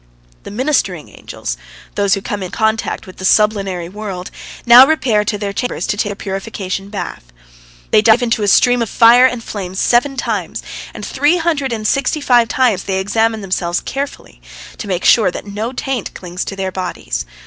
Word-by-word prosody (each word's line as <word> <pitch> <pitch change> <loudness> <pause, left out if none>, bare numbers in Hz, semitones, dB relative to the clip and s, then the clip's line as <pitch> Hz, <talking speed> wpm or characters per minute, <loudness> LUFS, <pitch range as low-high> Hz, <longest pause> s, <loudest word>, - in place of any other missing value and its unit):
The - - -10
ministering 260 +8 -1
angels, - - -6 0.4
those 200 -1 +2
who 195 - -5
come 205 -1 -4
in 185 - -4
contact 220 +2 -1
with 185 - -13
the - - -9
sublunary 195 -4 +2
world, 190 -2 -7 0.3
now 245 +2 +9
repair 245 -9 +2
to 210 0 -2
their 200 -1 -4
chambers 245 +4 -3
to - - -1
take 205 - -1
their 205 - -4
purification 195 -1 -5
bath. 200 - -6 0.7
They 215 - +5
dive 225 +2 +4
into 230 -2 0
a 205 - 0
stream 245 +4 +4
of 230 - -1
fire 240 +2 +6
and 245 -3 -4
flame 190 -4 -6
seven 245 +7 +2
times, - - -3 0.3
and - - -8
three 300 +5 +2
hundred 315 -6 -1
and 215 -2 -2
sixty 275 +5 0
five 245 -5 +3
times 225 -6 +1
they 190 -1 -1
examine 220 +3 0
themselves 180 -3 -1
carefully, 280 +1 -6 0.4
to 210 - -6
make 185 -2 -2
sure 215 -6 +5
that 180 - -7
no 210 +3 -4
taint 260 -3 -4
clings 180 0 -5
to 195 - -5
their 190 -1 -3
bodies. 185 -1 -4
215 Hz, 185 wpm, -16 LUFS, 195-245 Hz, 0.7 s, now